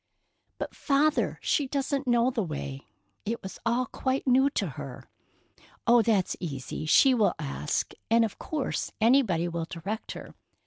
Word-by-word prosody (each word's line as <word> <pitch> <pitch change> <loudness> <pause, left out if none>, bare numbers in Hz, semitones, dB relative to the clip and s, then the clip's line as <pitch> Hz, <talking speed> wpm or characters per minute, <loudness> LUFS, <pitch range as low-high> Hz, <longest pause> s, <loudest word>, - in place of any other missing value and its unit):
"But, - - -5
Father, 295 +1 +2
she 285 - +1
doesn't 275 0 -1
know 240 +1 +3
the 240 - -1
way. 145 -5 -5 0.4
It 230 +2 -3
was 190 - -8
all 240 +2 +2
quite 260 +2 -2
new 265 +1 +4
to - - -1
her." - - -8 0.8
"Oh, 240 0 +6
that's 210 -4 +1
easy. 155 -2 -5
She 265 - +6
will 220 -4 +2
ask, 150 -1 -2 0.2
and 230 0 +5
of 215 - -7
course 300 -4 -2
anybody 220 -8 +3
will 170 -1 -3
direct 195 +7 -5
her. - - -10
230 Hz, 150 wpm, -28 LUFS, 175-265 Hz, 0.8 s, Oh